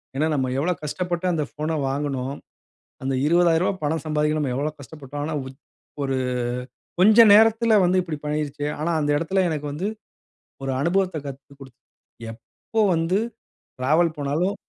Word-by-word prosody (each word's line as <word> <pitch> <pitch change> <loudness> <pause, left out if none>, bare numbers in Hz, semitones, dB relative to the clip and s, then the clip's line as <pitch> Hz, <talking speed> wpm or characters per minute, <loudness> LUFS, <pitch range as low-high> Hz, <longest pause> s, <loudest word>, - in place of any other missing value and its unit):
ஏன்னா 155 +3 +1
நம்ம 130 -2 0
எவ்வளோ 165 +6 +1
கஷ்டப்பட்டு 175 +3 -3
அந்த 155 -2 0
ஃபோன 155 +1 -2
வாங்குனோம்? 135 -1 -2 0.7
அந்த 135 0 -1
ரூ.20000 170 +2 +3
பணம் 155 +1 -1
சம்பாதிக்க 150 0 +1
நம்ம 135 -4 -1
எவ்வளோ 150 +3 -1
கஷ்டப்பட்டோம்? 145 0 -8
ஆனா 155 +1 -3
உச் 130 0 -11 0.4
ஒரு 135 -1 -1 0.8
கொஞ்சம் 215 +3 +7
நேரத்துல 225 +1 +5
வந்து 185 +1 +3
இப்டி 165 -4 -5
பண்ணீருச்சே! 150 -1 -2
ஆனா 160 +3 0
அந்த 145 -1 0
எடத்துல 175 +5 +1
எனக்கு 150 -2 -3
வந்து, 165 +7 -3 0.8
ஒரு 135 - -1
அனுபவத்த 180 +2 +1
கத்துக் 140 +1 -11
குடுத்தது. 130 -2 -14 0.5
எப்போ 220 - -5
வந்து 165 +3 +1 0.6
டிராவல் 155 +5 +2
போனாலும் 155 +8 -1
155 Hz, 145 wpm, -23 LUFS, 140-175 Hz, 0.8 s, கொஞ்சம்